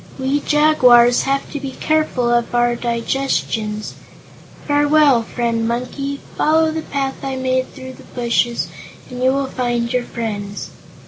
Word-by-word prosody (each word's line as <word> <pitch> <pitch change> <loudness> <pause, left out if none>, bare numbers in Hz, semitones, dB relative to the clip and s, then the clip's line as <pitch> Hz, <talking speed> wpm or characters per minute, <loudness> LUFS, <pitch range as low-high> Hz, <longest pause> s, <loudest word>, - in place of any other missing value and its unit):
We 270 +2 0
jaguars 250 -6 +5
have 275 0 0
to 290 - -4
be 270 -1 -6
careful 310 -6 0
of 240 0 +1
our 240 0 +2
digestions. 235 -3 -2 0.7
Farewell, 290 -3 +4
Friend 230 0 -2
Monkey. 275 +4 -3 0.2
Follow 315 +1 +3
the 320 0 -3
path 275 -2 -4
I 270 -1 -3
made 260 0 0
through 260 -1 -9
the - - -15
bushes 240 -1 0 0.4
and 250 0 -6
you 260 +1 +4
will 275 0 0
find 240 -2 -2
your 250 -1 0
friends." 205 -3 -5
255 Hz, 140 wpm, -19 LUFS, 235-275 Hz, 0.7 s, jaguars